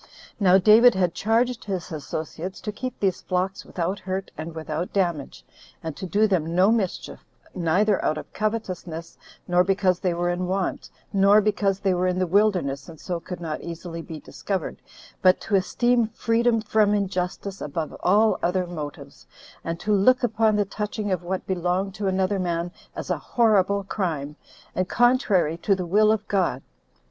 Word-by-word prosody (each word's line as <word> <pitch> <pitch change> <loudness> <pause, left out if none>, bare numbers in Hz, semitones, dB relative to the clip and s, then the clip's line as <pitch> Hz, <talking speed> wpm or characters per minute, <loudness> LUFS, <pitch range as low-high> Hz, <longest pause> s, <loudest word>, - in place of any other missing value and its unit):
Now 190 -2 +6
David 220 +5 +7
had 180 -3 +1
charged 230 +3 0
his 190 -3 -4
associates 160 +4 -5
to 210 - -4
keep 255 +4 -6
these 195 -3 0
flocks 185 +2 -2
without 180 +3 -3
hurt 190 +1 -4
and 160 +1 -7
without 160 +2 -4
damage, 170 -7 -2 0.4
and 160 -2 -4
to 190 - -6
do 210 +4 +3
them 170 -5 0
no 190 +4 +5
mischief, 210 -6 -2 0.3
neither 185 +4 +1
out 155 - +1
of - - -9
covetousness, 185 -6 -4 0.3
nor 180 0 +4
because 190 -1 +1
they 180 -2 0
were 175 +1 0
in 180 +1 -2
want, 190 0 -2 0.2
nor 200 +1 +6
because 200 -2 +1
they 195 -2 +2
were 180 +1 +1
in 180 0 0
the 185 - +1
wilderness, 175 -8 +1
and 160 -2 -12
so 175 -2 -3
could 180 +1 -7
not 160 -3 -4
easily 170 0 -6
be 160 -1 -8
discovered, 190 +3 -4 0.4
but 185 -1 +5
to 220 - -6
esteem 235 +5 +2
freedom 230 +1 +1
from 215 -1 +2
injustice 195 0 -3
above 155 +1 -4
all 210 +2 +3
other 180 +1 +1
motives, 155 -5 -8 0.4
and 165 0 -4
to 210 - 0
look 250 +6 +4
upon 220 -2 +2
the 205 -1 +2
touching 210 +1 -4
of 185 -2 0
what 185 +2 -4
belonged 185 +1 -1
to 200 0 -3
another 190 +1 +1
man 175 -1 -2 0.2
as - - -4
a - - 0
horrible 200 -4 +2
crime, 160 -8 -3 0.4
and 185 0 -1
contrary 235 - +3
to 195 +3 +1
the 185 -1 -4
will 210 +5 +4
of 215 -1 -1
God. 180 -10 0
190 Hz, 175 wpm, -24 LUFS, 175-210 Hz, 0.4 s, David